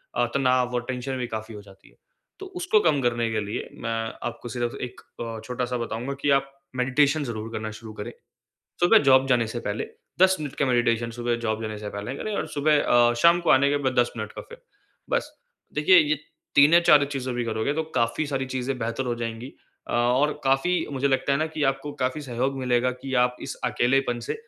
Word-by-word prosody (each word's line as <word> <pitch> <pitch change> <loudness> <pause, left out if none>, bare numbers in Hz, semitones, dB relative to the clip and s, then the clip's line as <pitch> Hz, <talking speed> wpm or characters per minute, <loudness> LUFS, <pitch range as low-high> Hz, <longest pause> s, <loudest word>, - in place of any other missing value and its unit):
अ, 120 - +2
तनाव 125 -2 +2
और 120 - +1
टेंशन 130 +1 -3
भी 125 -1 -3
काफ़ी 110 0 -6
हो 105 - -8
जाती 100 -1 -18
है। - - -26 0.4
तो 390 - -7
उसको 355 - +3
कम 150 -6 +2
करने 120 -2 0
के 110 - 0
लिए 105 - -5
मैं 115 - -2 0.4
आपको 120 0 -7
सिर्फ 120 -1 -3
एक 125 0 -7 0.2
अ, 115 -1 -5
छोटा-सा 125 +1 -2
बताऊँगा 120 +3 -4
कि 145 - +1
आप 135 0 -13 0.3
मेडिटेशन 140 +4 +2
ज़रूर 115 -3 -5
करना 110 -1 -4
शुरू 110 -1 -10
करें। 105 -1 -6 0.7
सुबह 175 +6 +6
जॉब 130 0 +6
जाने 120 -3 +3
से 120 +2 -5
पहले 105 0 -3 0.3
10 190 0 +6
मिनट 145 -3 -5
का 140 - +1
मेडिटेशन 120 -2 +1
सुबह 120 0 -2
जॉब 110 -1 -1
जाने 110 -1 -4
से 105 0 -6
पहले 100 +5 -5
करें 215 +6 -4
और - - -2
सुबह 150 +1 +2
अ, 120 0 +4
शाम 170 +8 +5
को 175 - +1
आने 140 0 +5
के 145 - +2
बाद 130 - +1
10 120 - 0
मिनट 110 -2 -5
का - - -8
फिर। 480 +1 -14 0.5
बस - - -1 0.4
देखिए 160 +5 +6
ये 155 -1 +3 0.4
3 145 +3 +7
या 170 - +8
4 150 -4 +6
चीज़ें 130 -2 -3
भी 120 0 -1
करोगे 110 +5 -1
तो 160 - 0
काफ़ी 115 +5 +1
सारी 135 -2 -2
चीज़ें 130 +1 -2
बेहतर 115 +2 -2
हो 120 - 0
जाएँगी। 115 +3 -5 0.4
अ, - - -4
और 125 +5 +2
काफ़ी 150 +6 +2
मुझे 140 +1 0
लगता 135 +1 +1
है 140 - +2
ना 155 - +1
कि 155 - -1
आपको 135 +2 -8
काफ़ी 130 +4 -1
सहयोग 130 +1 -2
मिलेगा 125 -1 +1
कि 135 -1 -4
आप 125 0 -2
इस - - -5
अकेलेपन 125 0 +1
से - - 0
125 Hz, 220 wpm, -25 LUFS, 120-140 Hz, 0.7 s, या